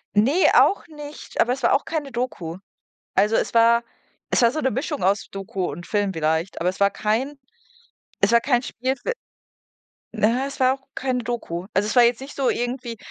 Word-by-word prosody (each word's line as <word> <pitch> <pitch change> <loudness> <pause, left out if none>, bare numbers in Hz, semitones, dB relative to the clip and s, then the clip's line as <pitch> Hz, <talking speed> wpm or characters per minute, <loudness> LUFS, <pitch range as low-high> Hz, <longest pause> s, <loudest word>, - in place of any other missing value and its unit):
Ne, 270 - +4
auch 400 - +4
nicht, 295 -2 -10
aber 245 - +3
es 265 - -7
war - - +4
auch 275 - +2
keine 300 -4 -3
Doku. 230 -9 -4 0.6
Also, 210 +3 +3
es - - -1
war 230 +1 +5 0.5
es - - +2
war 235 - +6
so 310 - -2
'ne 265 - +1
Mischung 280 +5 -3
aus 195 +2 +1
Doku 195 -1 -4
und 175 - -8
Film 205 -2 0
vielleicht, 160 +2 -1
aber 175 - +1
es 185 - -3
war 200 - +5
kein 230 +9 -1 0.9
es 195 - +4
war 235 - +6
kein 245 -1 +1
Spielfil 260 - -3 1.0
na 210 - +2
ja, 250 +4 0
es 275 - -9
war 260 0 +4
auch 270 - -23
keine 255 -2 -1
Doku. 200 -7 -4
Also, 200 +2 +1
es 215 - -2
war 245 - +7
jetzt 235 +1 +2
nicht 275 +2 -9
so 270 -2 +1
irgendwie, 245 -1 -3
240 Hz, 200 wpm, -23 LUFS, 200-265 Hz, 1.0 s, war